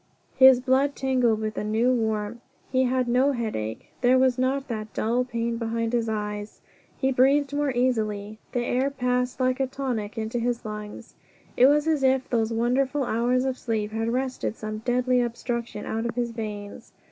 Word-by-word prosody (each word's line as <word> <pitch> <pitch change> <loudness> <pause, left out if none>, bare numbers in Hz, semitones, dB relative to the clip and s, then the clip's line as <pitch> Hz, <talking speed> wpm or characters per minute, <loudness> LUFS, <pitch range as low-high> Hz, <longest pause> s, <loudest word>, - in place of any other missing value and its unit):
His 260 -1 +8
blood 265 +2 +2
tingled 250 -5 +1
with 215 0 -3
a - - -3
new 225 +4 +2
warmth. 220 -1 -1 0.3
He 260 0 +3
had 255 0 +1
no 255 +4 +3
headache. 210 - -4
There 255 +1 +5
was 255 -1 +3
not 265 +2 0
that 215 -2 -5
dull 235 +3 +1
pain 235 -1 -2
behind 230 0 -2
his 230 -2 +1
eyes. 210 -1 -4 0.4
He 265 -1 +1
breathed 275 +3 +3
more 290 -1 +1
easily 215 -4 -1
the 245 -1 -1
air 260 +3 +1
passed 250 -1 -1
like 255 0 +1
a 265 - +1
tonic 250 -6 -4
into 225 +2 -2
his 240 0 -2
lungs. 210 -1 -7 0.4
It 255 - +6
was 295 +2 +3
as 310 -3 +2
if 265 0 +2
those 225 -2 +1
wonderful 255 +5 +1
hours 245 +2 +1
of 260 -1 -2
sleep 215 -3 -2
had 225 +1 -1
wrested 255 -2 -2
some 215 -1 -5
deadly 250 +2 +1
obstruction 235 -2 -3
out 225 +1 -2
of 230 - -5
his 240 -1 -1
veins. 210 -3 -7
245 Hz, 180 wpm, -25 LUFS, 220-260 Hz, 0.4 s, His